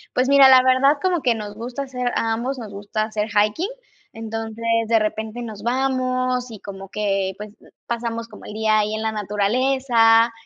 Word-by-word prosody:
Pues, 255 Hz, +1 st, +2 dB
mira, 275 Hz, -1 st, +8 dB
la 260 Hz, -1 st, +7 dB
verdad 260 Hz, +3 st, +4 dB
como 360 Hz, -4 st, +1 dB
que 240 Hz, -3 st, +2 dB
nos 210 Hz, -1 st, -7 dB
gusta 240 Hz, +5 st, -6 dB
hacer, 250 Hz, -2 st, -4 dB
a 225 Hz, 0 st, 0 dB
ambos 250 Hz, +4 st, -2 dB
nos 220 Hz, -4 st, -8 dB
gusta 205 Hz, +2 st, -3 dB
hacer 215 Hz, -1 st, -3 dB
hiking. 210 Hz, -, +1 dB, 0.5 s
Entonces, 225 Hz, 0 st, -6 dB, 0.2 s
de 230 Hz, 0 st, +3 dB
repente 220 Hz, +2 st, -3 dB
nos 220 Hz, -4 st, -7 dB
vamos 255 Hz, 0 st, -1 dB
y 215 Hz, -, -10 dB
como 195 Hz, -1 st, -9 dB
que, 195 Hz, -1 st, -1 dB
pues, 210 Hz, 0 st, -8 dB, 0.4 s
pasamos 230 Hz, -1 st, -4 dB
como 210 Hz, -, -13 dB
el -, -, -8 dB
día 215 Hz, 0 st, +2 dB
ahí 215 Hz, +1 st, -1 dB
en 220 Hz, -, -4 dB
la 220 Hz, 0 st, -1 dB
naturaleza. 225 Hz, +2 st, +2 dB
225 Hz, 185 wpm, -21 LUFS, 215-255 Hz, 0.5 s, mira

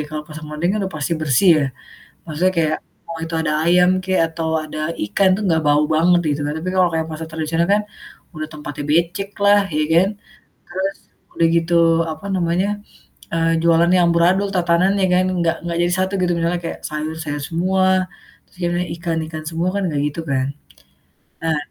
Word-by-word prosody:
Kalau 155 Hz, 0 st, -4 dB
pasar 155 Hz, +1 st, -9 dB
modern 150 Hz, +3 st, -2 dB
kan 215 Hz, -, -1 dB
udah 190 Hz, -, -5 dB
pasti 150 Hz, +3 st, -2 dB
bersih 155 Hz, +5 st, +3 dB
ya, 145 Hz, -, +2 dB, 0.6 s
maksudnya 175 Hz, +5 st, +1 dB
kayak 155 Hz, -1 st, +2 dB, 0.3 s
mau 165 Hz, -, -5 dB
itu 165 Hz, -, -8 dB
ada 155 Hz, -1 st, 0 dB
ayam 180 Hz, +1 st, +5 dB
kek 190 Hz, 0 st, +1 dB
atau 160 Hz, 0 st, -4 dB, 0.2 s
ada 155 Hz, 0 st, -7 dB, 0.3 s
ikan 190 Hz, -, +2 dB
tuh 210 Hz, -, -4 dB
gak 160 Hz, -1 st, +2 dB
bau 145 Hz, 0 st, +4 dB
banget 175 Hz, +2 st, +4 dB, 0.2 s
gitu 150 Hz, -, -7 dB
kan, 145 Hz, -, -2 dB
tapi 185 Hz, -, -4 dB
kalau 185 Hz, -1 st, +4 dB
kayak 160 Hz, 0 st, -1 dB
pasar 155 Hz, +1 st, -5 dB
tradisional 160 Hz, +1 st, -1 dB
kan 210 Hz, -, +2 dB, 0.6 s
udah 155 Hz, 0 st, -4 dB
tempatnya 145 Hz, -1 st, -6 dB
beceklah, 200 Hz, +5 st, +2 dB
iya 155 Hz, 0 st, +1 dB
kan? 175 Hz, +3 st, +5 dB, 0.6 s
Terus 190 Hz, +2 st, -3 dB, 0.4 s
udah 165 Hz, -, +5 dB
gitu, 170 Hz, +1 st, +1 dB, 0.4 s
apa 155 Hz, +6 st, -9 dB
namanya, 180 Hz, +2 st, +1 dB, 0.6 s
eee, 165 Hz, 0 st, +1 dB
jualannya 170 Hz, +2 st, +4 dB
amburadul, 175 Hz, +4 st, +3 dB
tatananya 180 Hz, +3 st, +2 dB
kan 185 Hz, +1 st, +3 dB
enggak 170 Hz, -1 st, +1 dB
enggak 170 Hz, 0 st, -3 dB
jadi 175 Hz, -, 0 dB
satu 190 Hz, +1 st, 0 dB
gitu. 180 Hz, -1 st, +1 dB
Misalnya 170 Hz, +1 st, 0 dB
kayak 165 Hz, -, -5 dB
sayur, 155 Hz, +1 st, -4 dB
sayur 145 Hz, -1 st, -4 dB
semua, 185 Hz, +3 st, +1 dB, 0.6 s
terus -, -, -26 dB
yang 175 Hz, -, 0 dB, 0.3 s
ikan, 165 Hz, -1 st, -2 dB
ikan 155 Hz, -1 st, -7 dB
semua, 165 Hz, +2 st, -1 dB
kan 200 Hz, -, -1 dB
enggak 150 Hz, -4 st, -1 dB
gitu 150 Hz, +3 st, -6 dB
kan? 130 Hz, -1 st, +1 dB, 1.0 s
Nah 160 Hz, -1 st, +1 dB
170 Hz, 180 wpm, -20 LUFS, 155-180 Hz, 1.0 s, ayam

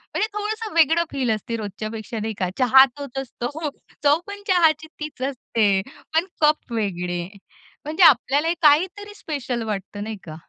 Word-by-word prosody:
म्हणजे 430 Hz, -, +1 dB
थोडंसं 430 Hz, +1 st, -4 dB
वेगळं 330 Hz, +1 st, +4 dB
फील 265 Hz, -3 st, -1 dB
असतं 220 Hz, +2 st, -3 dB
रोजच्यापेक्षा, 215 Hz, +2 st, -5 dB
नाही 220 Hz, +1 st, -3 dB
का. 185 Hz, -, 0 dB
चहा 265 Hz, +1 st, +7 dB
तोच 280 Hz, -2 st, -8 dB
असतो. 270 Hz, +4 st, -4 dB, 0.3 s
चव 290 Hz, +2 st, +4 dB
पण 405 Hz, 0 st, -7 dB
चहाची 320 Hz, -4 st, +3 dB
तीच 300 Hz, -4 st, -7 dB
असते, 215 Hz, -7 st, +1 dB, 0.3 s
पण 325 Hz, +2 st, +3 dB, 0.2 s
कप 300 Hz, -4 st, +2 dB
वेगळे 180 Hz, -5 st, -2 dB, 0.6 s
म्हणजे 315 Hz, +5 st, +1 dB
आपल्याला 295 Hz, +2 st, +5 dB
काहीतरी 370 Hz, +7 st, +3 dB
स्पेशल 265 Hz, -, -4 dB
वाटतं, 205 Hz, 0 st, -4 dB
नाही 220 Hz, 0 st, -5 dB
का. 155 Hz, -2 st, -9 dB
275 Hz, 150 wpm, -23 LUFS, 220-320 Hz, 0.6 s, चहा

